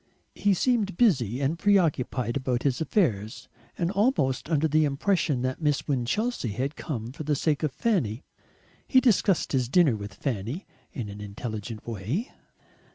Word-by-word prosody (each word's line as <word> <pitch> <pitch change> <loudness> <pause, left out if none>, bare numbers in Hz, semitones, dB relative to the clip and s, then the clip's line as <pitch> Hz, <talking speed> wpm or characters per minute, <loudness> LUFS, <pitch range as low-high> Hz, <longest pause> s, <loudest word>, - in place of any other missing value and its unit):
He 205 -1 +2
seemed 210 -4 +1
busy 130 - +2
and 150 +5 0
preoccupied 150 -11 +2
about 130 -3 -1
his 135 -1 0
affairs, 115 - 0 0.3
and 170 +1 0
almost 195 - +1
under 160 -1 +2
the 155 +1 +3
impression 145 -2 +1
that 130 +4 -2
Miss 150 -2 0
Winchelsea 140 - -1
had 135 +7 -2
come 120 -8 -5
for 140 - -9
the 150 0 +1
sake 150 +1 0
of 155 -3 0
Fanny. 150 - 0 0.6
He 260 - +6
discussed 210 - +2
his 125 -3 +1
dinner 155 -5 +4
with 100 -2 -7
Fanny 125 - -3 0.3
in 125 - -5
an 100 0 -8
intelligent 105 +1 -6
way. 115 - -3
140 Hz, 155 wpm, -27 LUFS, 120-180 Hz, 0.6 s, He